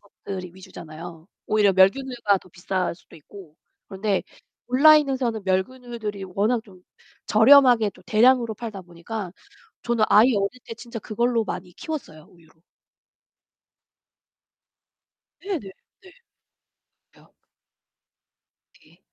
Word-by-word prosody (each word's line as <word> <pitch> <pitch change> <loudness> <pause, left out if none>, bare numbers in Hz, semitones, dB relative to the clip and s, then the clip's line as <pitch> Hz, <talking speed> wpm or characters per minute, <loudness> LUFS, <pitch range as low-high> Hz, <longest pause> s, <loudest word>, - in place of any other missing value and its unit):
것들이 190 -2 -9
위주잖아요, 165 -2 -11 0.2
오히려 210 -2 +3
멸균 190 +8 +4
우유가 235 -6 0
더 185 - -20
비쌀 180 +1 -3
수도 170 - -19
있고. 165 +1 -15 0.3
그런데 195 0 -1 0.4
온라인에서는 265 -4 +3
멸균 190 +7 -1
우유들이 215 -5 -6
워낙 210 +5 -1
좀 185 -4 -18 0.4
저렴하게 240 -1 +6
좀 - - -20
대량으로 235 +1 +3
팔다 215 -3 -7
보니까 175 +3 -7 0.5
저는 235 -2 +1
아이 230 +3 +5
어릴 200 +5 -2
때 230 - -7
진짜 235 0 -9
그걸로 235 +2 -1
많이 180 -3 -7
키웠어요, 210 - -7
우유로. 160 -2 -24 2.8
네네. 330 - -5 0.3
네. 375 - -17 1.0
맞아요. - - -24 1.5
네. - - -25
210 Hz, 260 characters per minute, -23 LUFS, 185-240 Hz, 2.8 s, 저렴하게